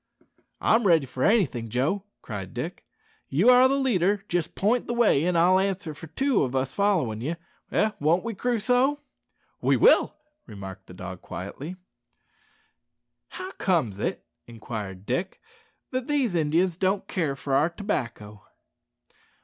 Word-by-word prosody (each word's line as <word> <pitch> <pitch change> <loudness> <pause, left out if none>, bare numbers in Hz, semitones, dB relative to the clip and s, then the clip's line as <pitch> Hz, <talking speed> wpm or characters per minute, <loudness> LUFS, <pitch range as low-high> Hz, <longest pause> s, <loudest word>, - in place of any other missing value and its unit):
"I'm 225 -2 +3
ready 165 -5 +4
for 130 0 -4
anything, 145 - +2
Joe," 145 - 0 0.2
cried 100 -5 -7
Dick; - - -5 0.4
"you 180 - +4
are 250 +1 +7
leader. 210 -8 +1
Just 175 -2 -2
point 225 +5 +1
the 240 - -2
way, 220 -11 +4
and 180 -1 +1
I'll 180 +3 +5
answer 190 -4 -2
for 155 +2 -10
two 265 - +1
o' 135 - +2
us 130 0 -3
followin' 170 - +1
ye 155 +7 -2 0.4
eh! 215 - +2
won't 165 +4 +2
we, 230 0 -3
Crusoe?" 250 +6 +1 0.6
"We - - +3
will," - - +5 0.3
remarked 95 -3 -9
the 90 - -12
dog 95 0 -8
quietly. 160 +7 -7 1.5
"How 370 +1 -7
comes 130 - +1
it," - - -3 0.2
inquired 105 -5 -7
Dick, 175 - -2 0.5
"that 255 -1 -2
these 275 -8 +1
Indians 165 +2 +1
don't 190 +1 0
care 155 -7 -1
for 140 0 -4
our 145 +5 +4
tobacco?" 115 - -4
170 Hz, 140 wpm, -26 LUFS, 125-210 Hz, 1.5 s, are